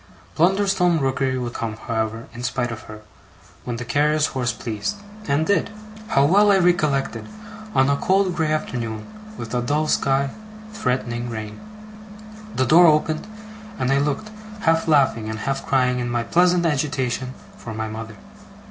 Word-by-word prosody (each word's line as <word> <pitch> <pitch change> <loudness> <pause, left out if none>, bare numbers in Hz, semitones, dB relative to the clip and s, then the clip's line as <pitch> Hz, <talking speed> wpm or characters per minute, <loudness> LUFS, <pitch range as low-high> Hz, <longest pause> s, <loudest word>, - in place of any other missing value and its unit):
Blunderstone 180 - +3
Rookery 130 -1 0
would 120 -1 -4
come, 110 -1 -4
however, 110 0 -3
in 120 - -8
spite 120 -1 -1
of 110 -2 -6
her, 110 0 -9 0.6
when 120 - -3
the 120 +1 -5
carrier's 150 +3 +2
horse 125 -2 0
pleased 115 - -4 0.3
and 145 +2 +2
did. 200 - +1 0.4
How 140 -6 +3
well 205 +6 +5
I 195 - +5
recollect 155 -7 +2
it, - - -6 0.5
on 130 - +4
a 140 - +3
cold 190 +1 +2
grey 160 -2 0
afternoon, 115 -8 -3 0.3
with 115 - -7
a 125 - +1
dull 150 +5 0
sky, 135 -1 +1 0.4
threatening 120 - -2
rain! 110 -2 -6 1.0
The 130 - +2
door 170 +7 +7
opened, 155 +2 +2 0.5
and 130 -6 0
I 135 - +3
looked, 150 +10 -2 0.3
half 165 -1 +2
laughing 135 -8 +3
and 110 - -4
half 135 +5 -2
crying 125 -2 +2
in 120 -1 -2
my 120 -1 0
pleasant 175 +4 +3
agitation, 130 -4 -1 0.2
for 110 -2 -8
my 110 0 -3
mother. 110 0 -7
135 Hz, 160 wpm, -22 LUFS, 120-155 Hz, 1.0 s, door